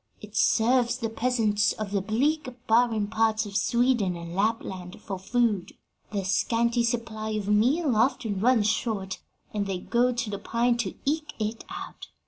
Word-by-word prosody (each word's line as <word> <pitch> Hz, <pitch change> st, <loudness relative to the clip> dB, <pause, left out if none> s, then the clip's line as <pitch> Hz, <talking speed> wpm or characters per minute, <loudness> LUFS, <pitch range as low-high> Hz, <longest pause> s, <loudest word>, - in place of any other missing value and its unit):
It -, -, -12 dB
serves 240 Hz, +1 st, +3 dB
the 230 Hz, -3 st, -3 dB
peasants 225 Hz, -3 st, +1 dB
of 215 Hz, -2 st, -5 dB
the 200 Hz, -1 st, +1 dB
bleak, 265 Hz, +8 st, 0 dB, 0.2 s
barren 225 Hz, -2 st, +3 dB
parts 220 Hz, +1 st, +1 dB
of 200 Hz, -1 st, -8 dB
Sweden 235 Hz, -3 st, +2 dB
and 170 Hz, 0 st, -7 dB
Lapland 195 Hz, -3 st, -2 dB
for 195 Hz, -3 st, -6 dB
food: 210 Hz, -1 st, 0 dB, 0.4 s
their 200 Hz, -3 st, -2 dB
scanty 235 Hz, +4 st, +1 dB
supply 230 Hz, -2 st, -2 dB
of 210 Hz, -2 st, -3 dB
meal 250 Hz, +7 st, +3 dB
often 225 Hz, -3 st, +1 dB
runs 230 Hz, 0 st, +3 dB
short, 205 Hz, -4 st, -1 dB, 0.3 s
and 205 Hz, -2 st, -1 dB
they 190 Hz, -2 st, -2 dB
go 240 Hz, +6 st, +1 dB
to 235 Hz, -2 st, -2 dB
the 200 Hz, -, -4 dB
pine 235 Hz, +1 st, +1 dB
to 210 Hz, -6 st, -2 dB
eke 300 Hz, +1 st, -1 dB
it 220 Hz, +1 st, -3 dB
out. -, -, -8 dB
225 Hz, 160 wpm, -27 LUFS, 205-240 Hz, 0.4 s, serves